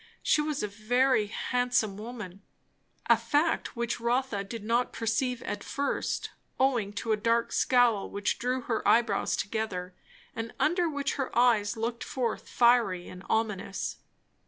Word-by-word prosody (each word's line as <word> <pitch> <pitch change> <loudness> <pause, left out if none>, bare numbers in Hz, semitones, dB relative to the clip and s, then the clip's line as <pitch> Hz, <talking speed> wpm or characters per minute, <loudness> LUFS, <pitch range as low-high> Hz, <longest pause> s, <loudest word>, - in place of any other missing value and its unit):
She 300 - +3
was 300 -3 -2
a - - 0
very 220 +2 +2
handsome 245 -2 0
woman; 210 -3 -8 0.6
a - - +6
fact 305 0 0
which 235 0 -2
Rotha 235 -3 0
did 205 +2 -7
not 235 +3 +1
perceive 240 +2 -1
at 205 0 -4
first, 280 0 -2 0.3
owing 245 -6 +2
to 220 +2 -3
a 215 - +3
dark 230 +2 +1
scowl 245 -5 +3
which 200 +1 -1
drew 250 +2 -1
her 230 -2 -2
eyebrows 225 -4 +3
together, 200 -4 -3 0.4
and 225 0 -5
under 345 +2 +2
which 285 -2 -2
her 270 -2 -1
eyes 230 -3 +3
looked 230 +1 -2
forth 240 -4 -3
fiery 235 -7 +3
and 180 - -10
ominous. 210 -3 -1
230 Hz, 145 wpm, -29 LUFS, 210-250 Hz, 0.6 s, a